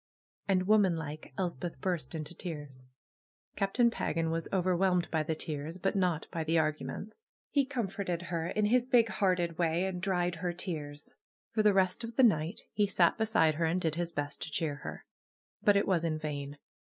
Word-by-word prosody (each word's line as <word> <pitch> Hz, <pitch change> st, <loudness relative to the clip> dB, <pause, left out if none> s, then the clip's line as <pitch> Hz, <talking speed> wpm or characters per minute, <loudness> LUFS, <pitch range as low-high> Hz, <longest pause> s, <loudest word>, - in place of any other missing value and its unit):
And, 185 Hz, -2 st, +2 dB
womanlike, 170 Hz, -8 st, +1 dB
Elspeth 175 Hz, -5 st, -3 dB
burst 170 Hz, -3 st, -2 dB
into 155 Hz, +1 st, -5 dB
tears. 145 Hz, -7 st, -7 dB, 0.7 s
Captain 235 Hz, +4 st, +2 dB
Pagan 165 Hz, -6 st, -1 dB
was 165 Hz, 0 st, -2 dB
overwhelmed 185 Hz, -1 st, +2 dB
by 160 Hz, -, +2 dB
the 155 Hz, +1 st, -1 dB
tears; 155 Hz, +1 st, -5 dB
but 195 Hz, +2 st, -1 dB
not 180 Hz, -5 st, +1 dB
by 165 Hz, -3 st, -2 dB
the 160 Hz, +1 st, +1 dB
arguments. 160 Hz, -, -2 dB, 0.3 s
He 280 Hz, -2 st, +2 dB
comforted 195 Hz, -9 st, -2 dB
her 170 Hz, -2 st, -2 dB
in 210 Hz, +3 st, +1 dB
his 245 Hz, +3 st, +3 dB
big 240 Hz, -3 st, +4 dB
hearted 180 Hz, -4 st, 0 dB
way, 170 Hz, +1 st, +2 dB
and 185 Hz, -2 st, -3 dB
dried 180 Hz, -3 st, 0 dB
her 175 Hz, +1 st, -2 dB
tears. 150 Hz, -5 st, -5 dB, 0.4 s
For 215 Hz, -, +2 dB
the 210 Hz, -2 st, +4 dB
rest 185 Hz, +3 st, +2 dB
of 230 Hz, 0 st, -6 dB
the 265 Hz, -, +5 dB
night 165 Hz, -7 st, +3 dB
he 205 Hz, -1 st, +2 dB
sat 180 Hz, -3 st, +3 dB
beside 220 Hz, -8 st, +3 dB
her 165 Hz, +2 st, 0 dB
and 165 Hz, +3 st, +1 dB
did 160 Hz, -4 st, 0 dB
his 170 Hz, +1 st, -2 dB
best 145 Hz, -2 st, -4 dB
to -, -, -3 dB
cheer 150 Hz, -1 st, -1 dB
her. -, -, -8 dB, 0.6 s
But 205 Hz, -1 st, +5 dB
it 200 Hz, -, +2 dB
was 180 Hz, -4 st, +2 dB
in 160 Hz, -2 st, 0 dB
vain 145 Hz, -2 st, -5 dB
175 Hz, 185 wpm, -31 LUFS, 160-195 Hz, 0.7 s, the